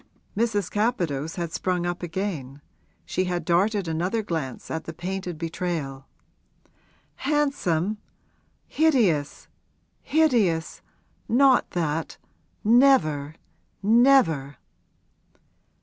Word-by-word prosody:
Mrs. 210 Hz, -4 st, 0 dB
Capadose 170 Hz, -, -1 dB
had 170 Hz, -2 st, -4 dB
sprung 180 Hz, -2 st, -1 dB
up 175 Hz, 0 st, -3 dB
again; 165 Hz, -7 st, -4 dB, 0.5 s
she 185 Hz, -, -1 dB
had 175 Hz, -2 st, -3 dB
darted 195 Hz, +3 st, +1 dB
another 180 Hz, +8 st, -1 dB
glance 160 Hz, -, -5 dB
at 160 Hz, 0 st, -4 dB
the 165 Hz, -, -6 dB
painted 180 Hz, 0 st, -5 dB
betrayal. 160 Hz, -5 st, -4 dB, 1.1 s
'Handsome? 265 Hz, -, 0 dB, 0.7 s
Hideous, 220 Hz, -, +1 dB, 0.5 s
hideous! 235 Hz, -, +1 dB, 0.5 s
Not 260 Hz, +1 st, +4 dB
that 160 Hz, -2 st, -2 dB, 0.5 s
never, 210 Hz, -, +3 dB, 0.5 s
never!' 205 Hz, -, +4 dB
180 Hz, 85 wpm, -25 LUFS, 160-225 Hz, 1.1 s, Not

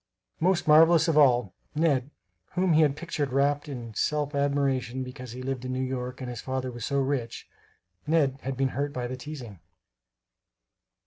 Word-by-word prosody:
Most 180 Hz, 0 st, +1 dB
marvelous 160 Hz, +2 st, +6 dB
of 165 Hz, -, +2 dB
all, 125 Hz, -9 st, +4 dB, 0.2 s
"Ned" 145 Hz, -4 st, +2 dB, 0.4 s
whom 180 Hz, -1 st, +2 dB
he 155 Hz, -, +5 dB
had 145 Hz, -3 st, +3 dB
pictured 150 Hz, -4 st, -3 dB
wrapt 145 Hz, +3 st, +1 dB
in 120 Hz, -5 st, -7 dB
self 150 Hz, +5 st, -1 dB
admiration 135 Hz, -3 st, 0 dB
because 125 Hz, -2 st, -8 dB
he 130 Hz, +1 st, -7 dB
lived 130 Hz, -1 st, -3 dB
in 130 Hz, 0 st, -3 dB
New 130 Hz, 0 st, -1 dB
York 130 Hz, 0 st, -4 dB
and 130 Hz, -, -4 dB
his 120 Hz, -2 st, -5 dB
father 130 Hz, -1 st, -3 dB
was 120 Hz, -2 st, -8 dB
so 140 Hz, +3 st, 0 dB
rich 135 Hz, -4 st, -2 dB, 0.6 s
Ned 145 Hz, -4 st, +2 dB
had 135 Hz, 0 st, -4 dB
been 135 Hz, 0 st, +1 dB
hurt 140 Hz, +3 st, -3 dB
by 125 Hz, -1 st, -3 dB
the 125 Hz, +1 st, -4 dB
teasing. 130 Hz, -, -8 dB
135 Hz, 175 wpm, -27 LUFS, 125-150 Hz, 0.6 s, marvelous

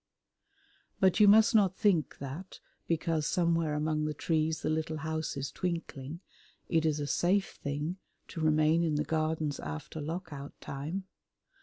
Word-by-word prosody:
But 190 Hz, +1 st, +4 dB
you 210 Hz, -, +8 dB
must 220 Hz, +2 st, +7 dB
not 195 Hz, -4 st, +4 dB
think 175 Hz, -9 st, +2 dB
that, 140 Hz, +8 st, -7 dB, 0.3 s
because 160 Hz, -2 st, 0 dB
somewhere 165 Hz, -3 st, +1 dB
among 155 Hz, 0 st, 0 dB
the 150 Hz, 0 st, -2 dB
trees 160 Hz, +1 st, 0 dB
the -, -, 0 dB
little 155 Hz, 0 st, -1 dB
house 160 Hz, -1 st, -3 dB
is 140 Hz, 0 st, -3 dB
twinkling, 165 Hz, -3 st, -4 dB, 0.5 s
it 160 Hz, -1 st, +2 dB
is 155 Hz, -1 st, 0 dB
a 145 Hz, -, -1 dB
safe 190 Hz, +6 st, +1 dB
thing 150 Hz, +5 st, -2 dB, 0.3 s
to 165 Hz, -, -5 dB
remain 155 Hz, +1 st, +3 dB
in 160 Hz, -3 st, +1 dB
the 150 Hz, -, +1 dB
Gardens 155 Hz, -2 st, -1 dB
after 75 Hz, -, -6 dB
Lock 170 Hz, +4 st, -4 dB
out 140 Hz, 0 st, -9 dB
Time. 155 Hz, +8 st, -4 dB
160 Hz, 155 wpm, -31 LUFS, 150-170 Hz, 0.5 s, you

